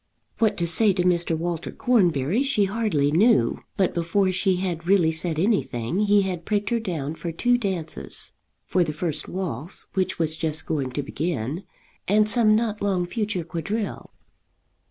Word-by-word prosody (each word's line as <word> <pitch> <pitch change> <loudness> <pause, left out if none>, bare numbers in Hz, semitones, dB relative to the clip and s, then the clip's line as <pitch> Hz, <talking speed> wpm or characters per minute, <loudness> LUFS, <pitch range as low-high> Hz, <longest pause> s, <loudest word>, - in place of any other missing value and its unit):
What 220 -2 +2
to 170 - 0
say 195 +5 +5
to 180 -1 0
Mr. 175 -2 +1
Walter 170 0 -3
Cornbury 180 - +2
she 270 -7 +2
hardly 195 -9 0
knew; 165 - +3 0.2
but 190 -2 +2
before 180 +3 +1
she 185 +1 +2
had 175 -2 -3
really 180 -4 +4
said 160 0 -2
anything 175 - 0
he 205 -1 +4
had 180 -3 -3
pricked 205 +1 -1
her 235 - +2
down 160 -9 -3
for 165 +1 -5
two 245 +9 +2
dances, 190 -9 -2 0.3
for 180 - +2
the 155 -2 -3
first 155 -1 -2
waltz, 175 -4 -4
which 190 -1 -1
was 160 -1 -1
just 155 -1 -1
going 140 -5 -1
to 145 - -2
begin, 150 - -3 0.4
and 210 +2 +4
some 215 -1 +4
not 220 -2 -1
long 190 -3 +1
future 210 -2 -2
quadrille. 200 +6 -4
180 Hz, 165 wpm, -24 LUFS, 160-205 Hz, 0.4 s, say